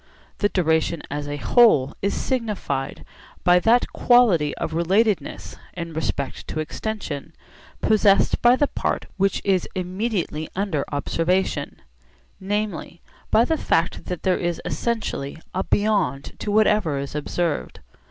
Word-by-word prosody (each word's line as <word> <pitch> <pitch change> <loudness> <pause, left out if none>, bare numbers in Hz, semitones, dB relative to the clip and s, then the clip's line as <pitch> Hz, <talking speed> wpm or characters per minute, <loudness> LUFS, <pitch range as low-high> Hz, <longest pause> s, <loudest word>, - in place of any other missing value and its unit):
The 205 - +2
duration 160 -3 +1
as 145 0 -3
a 145 0 -3
whole 150 - +4
is 200 - 0
signified 210 - -3 0.4
by 180 0 +6
that 230 +6 +3
quality 210 - +4
of - - -3
relatedness 195 +5 0 0.2
(in 170 -2 -5
respect 140 -3 -3
to - - -4
extension) 160 -3 -5 0.5
possessed 210 -2 +3
by 240 +1 +6
the 290 - +2
part - - -2
which 195 +1 +1
is 190 -3 +1
immediately 185 -4 -2
under 190 -7 -1
observation; 165 - -1 0.6
namely, 195 -4 -3 0.3
by 230 - +4
the 320 - 0
fact 165 - 0
that 180 -2 -5
there 185 -1 +2
is 175 -1 -1
essentially 220 -12 -2 0.2
a 190 - -1
beyond 200 -11 0
to 210 - -3
whatever 210 -7 +3
is 140 0 -5
observed. 150 +1 -2
180 Hz, 130 wpm, -23 LUFS, 155-215 Hz, 0.6 s, by